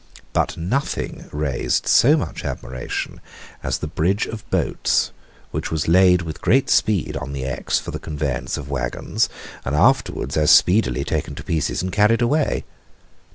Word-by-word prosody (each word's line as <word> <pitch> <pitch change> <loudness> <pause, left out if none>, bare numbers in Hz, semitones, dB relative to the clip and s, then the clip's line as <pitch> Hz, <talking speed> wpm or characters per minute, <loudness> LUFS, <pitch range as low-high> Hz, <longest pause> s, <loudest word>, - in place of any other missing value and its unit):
But - - 0
nothing 105 - -3
raised 75 -3 -1
so 145 +6 +5
much 145 - -4
admiration 65 0 -5 0.4
as - - -1
the 75 - -4
bridge 90 +7 0
of 110 -2 -8
boats, - - +1 0.4
which - - -3
was 80 -2 -1
laid 90 +1 +5
with 80 -2 -7
great 135 +3 +3
speed 105 -6 +2
on 70 - -5
the 70 -2 -4
Exe 65 - -1
for - - -5
the - - -5
conveyance 75 -3 -3
of 70 - -7
waggons, 60 -4 -1 0.3
and 70 - -2
afterwards 75 - +2
as 75 -1 +3
speedily 90 - +4
taken - - -2
to - - -8
pieces 80 +1 -1
and 95 - -2
carried 110 +3 +3
away. 145 +5 +1
85 Hz, 155 wpm, -21 LUFS, 75-110 Hz, 0.4 s, so